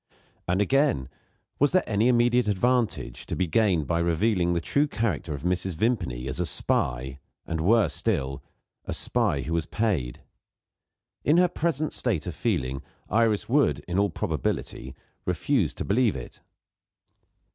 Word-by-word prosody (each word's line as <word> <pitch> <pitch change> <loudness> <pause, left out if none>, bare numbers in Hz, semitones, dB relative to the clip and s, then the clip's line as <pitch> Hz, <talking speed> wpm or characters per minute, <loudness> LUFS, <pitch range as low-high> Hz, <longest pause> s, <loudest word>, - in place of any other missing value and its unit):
And, 90 +3 +1
again, 135 - +2 0.5
was 145 +3 +3
there 185 - +4
any 105 +2 +1
immediate 120 -1 +3
advantage 110 - 0
to - - -3
be 95 - 0
gained 90 -2 +2
by 85 +2 0
revealing 85 +1 +1
the 85 - +1
true 140 - +1
character 110 - -2
of 70 -1 -5
Mrs. 90 0 -1
Vimpany, 85 - -1
as 65 +5 -3
a 90 - +1
spy, 65 -1 0 0.3
and, 80 -2 -3
worse 110 +6 +3
still, 70 -11 -1 0.4
a - - -3
spy - - +1
who 80 - -4
was 85 -1 -1
paid? 90 - -1 1.0
In 150 +3 +4
her 180 0 +5
present 160 -3 -1
state 105 -11 -1
of 90 - -4
feeling, 70 - -1 0.3
Iris 110 -2 +2
would, 145 +4 +2
in 90 +2 0
all 100 0 +2
probability, 70 -4 -3 0.3
refuse 90 - +1
to - - -4
believe 115 +2 +2
it. - - -9
95 Hz, 150 wpm, -26 LUFS, 80-120 Hz, 1.0 s, her